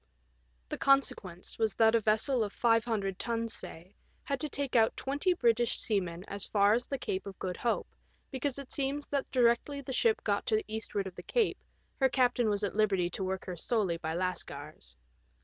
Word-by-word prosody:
The - - -4
con 275 0 +6
sequence 180 -3 -8
was 220 -2 +1
that 225 0 +5
a 230 - +4
vessel 220 +4 +2
of 205 - -4
500 225 -5 +1
tons, 230 -1 -2
say, 175 +4 -9 0.3
had 275 -1 -2
to 305 - -1
take 280 -2 -2
out 225 -1 +4
twenty 285 +7 0
British 235 -5 +2
seamen 180 -4 -1
as 200 0 -1
far 205 0 +4
as 240 +2 0
the 275 - -2
Cape 190 -5 -3
of 195 - -8
Good 180 -1 -3
Hope, 235 - -1 0.4
because 270 0 -2
it 275 -2 -8
seems 280 +1 -1
that 280 -2 -1
directly 250 +3 +2
the 270 -1 -6
ship 445 - +2
got - - 0
to 435 - +3
the 430 -2 0
eastward 215 -2 -3
of 190 - -6
the - - -9
Cape 470 -3 0 0.4
her 265 -1 +4
captain 245 -3 +2
was 205 0 0
at 200 - -1
liberty 195 -5 +2
to 190 - -2
work 190 0 -3
her 180 - -5
solely 190 -1 +1
by 160 -1 -3
Lascars. 150 - -3
225 Hz, 200 wpm, -31 LUFS, 190-265 Hz, 0.4 s, con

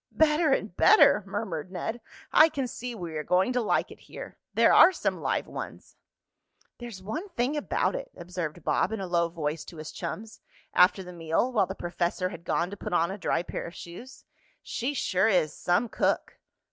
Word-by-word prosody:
"Better 310 0 +4
and 205 -8 0
better!" 210 - +6
murmured 185 -5 -4
Ned. 225 +6 -4 0.3
"I 315 - +8
can 270 -4 -2
see 245 0 -6
we 170 -6 -6
are 155 - -3
going 185 +9 +2
to 250 - +1
like 220 - 0
it - - -12
here. - - -10 0.2
There - - +5
are - - +9
some - - -2
live - - 0
ones." - - -8 0.8
"There's 235 -6 -8
one 315 - -5
thing 270 -3 -1
about 295 - 0
it," - - -5
observed 175 -2 -5
Bob - - +1
in 220 - -3
a 195 - -3
low 170 -1 +1
voice 160 -2 -3
to 170 - -11
his 155 0 -7
chums, 220 +1 -6 0.3
after 190 +1 +5
the 180 0 -10
meal, 165 +8 0
while 210 -6 +2
the - - -5
professor 175 +1 -2
had 170 -2 -10
gone 175 +2 0
to 205 - -7
put - - -5
on 170 +1 +2
a 195 - -5
dry 175 - 0
pair - - -5
of 170 - -10
shoes, 180 +10 -11 0.4
"she 265 +5 -3
sure 190 -5 +2
is 180 -8 +2
some 180 +7 +1
cook!" - - -1
190 Hz, 195 wpm, -28 LUFS, 175-240 Hz, 0.8 s, are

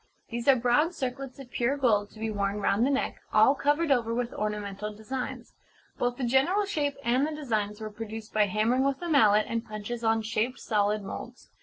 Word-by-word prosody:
These 235 +2 -4
are 275 - +8
broad 255 +8 +2
circlets 260 -1 -4
of 265 -3 -11
pure 255 +4 0
gold 210 -7 +2
to 215 - -15
be 220 0 -2
worn 200 0 -1
round 210 +4 +2
the - - +1
neck, 275 -1 -1
all 220 +5 +6
covered 290 +2 +1
over 230 -3 +2
with 245 0 -2
ornamental 210 0 -3
designs. 220 +5 -6 0.5
Both 245 0 0
the 265 - -4
general 275 - +3
shape 295 -8 -1
and 255 +4 +2
the 310 - -4
designs 215 -8 -2
were 215 -1 -6
produced 220 0 -7
by 210 -1 +3
hammering 220 +6 +2
with 275 -1 0
a - - -2
mallet 215 -9 +5
and 230 0 -2
punches 230 +1 -6
on 225 0 +2
shaped 230 +3 -1
solid 210 -1 0
moulds. 240 +5 -8
235 Hz, 200 wpm, -28 LUFS, 215-270 Hz, 0.5 s, are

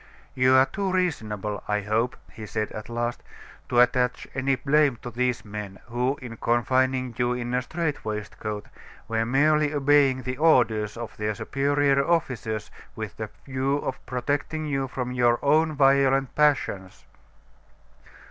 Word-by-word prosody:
"You 130 0 +4
are 130 0 +7
too 195 +7 -3
reasonable, 110 - -2
I 105 0 0
hope," 110 +5 0 0.2
he 110 -1 -8
said, 105 +1 -3
at 110 - -8
last, 120 +1 -2 0.5
"to 120 - +3
attach 125 0 +2
any 135 +1 +1
blame 145 +1 +2
to 120 - -6
these 125 0 -1
men, 105 -2 -7
who, 125 +4 -1
in 115 -2 -8
confining 130 +2 +1
you 120 0 +2
in 125 0 -4
a 125 - +2
strait 160 +2 -3
waistcoat, 105 0 -5 0.4
were 115 0 0
merely 150 +3 +3
obeying 140 -2 +3
the 125 0 -4
orders 115 -9 +3
of 115 -1 -7
their 105 0 -2
superior 140 +4 +1
officers 125 -10 -1 0.2
with - - -6
the - - -5 0.2
view 135 +1 0
of 135 -2 -5
protecting 145 +5 -2
you 135 -2 -1
from 125 -1 -4
your 120 -1 +3
own 155 +2 +3
violent 135 -1 +3
passions." 135 -11 0
125 Hz, 150 wpm, -25 LUFS, 115-140 Hz, 0.5 s, are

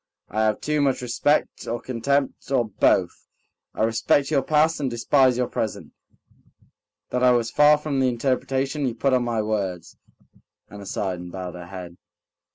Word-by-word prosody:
I 110 - -1
have 110 -1 0
too 150 -1 0
much 135 -3 +1
respect 130 +5 0
or 120 +1 -2
contempt, 135 +3 -2
or 125 -4 +1
both... 95 -3 +1 0.5
I - - 0
respect 115 +6 +1
your 140 -3 +3
past 155 +3 +2
and 140 -3 -1
despise 125 +2 +2
your 125 - +1
present... 110 - -4 1.2
that 125 - -1
I 125 - +5
was 120 -2 0
far 150 0 +5
from 150 -2 -2
the 130 -1 +3
interpretation 135 +3 -1
you 120 - -3
put 135 +3 +1
on 125 -1 +3
my 115 -2 -1
words." 100 -5 -3 0.7
Anna 100 -1 -9
sighed 95 -3 -3
and 90 0 -9
bowed 90 -1 -6
her 90 -1 -9
head. 90 -2 -9
125 Hz, 165 wpm, -23 LUFS, 105-135 Hz, 1.2 s, I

